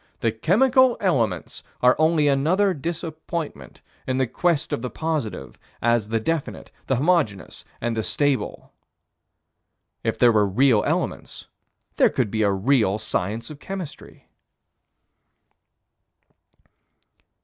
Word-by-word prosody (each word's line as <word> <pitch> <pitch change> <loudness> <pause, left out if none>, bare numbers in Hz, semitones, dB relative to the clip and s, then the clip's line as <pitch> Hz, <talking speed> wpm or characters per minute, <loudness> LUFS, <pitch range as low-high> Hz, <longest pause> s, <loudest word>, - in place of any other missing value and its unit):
The 115 - +1
chemical 245 - +3
elements 115 - -1 0.2
are 125 0 +6
only 155 -1 +3
another 170 +9 +2
disappointment 160 - -6 0.3
in 130 0 0
the 130 - +2
quest 160 +5 0
for - - 0
the 125 +2 -5
positive, 150 - -4 0.2
as 115 -2 +1
the 115 +1 0
definite, 160 +6 -3 0.2
the 135 - +2
homogeneous, 140 - 0 0.2
and 120 -1 -2
the 110 - 0
stable. 145 +4 -1 1.3
If - - -1
there 120 - +5
were 105 -2 +3
real 115 +2 +3
elements, - - -3 0.5
there - - +5
could 115 -6 -1
be 110 - -1
a 100 -2 +3
real 105 0 +2
science 110 - -3
of 145 - -10
chemistry. 190 -4 -8
135 Hz, 115 wpm, -23 LUFS, 110-165 Hz, 1.3 s, are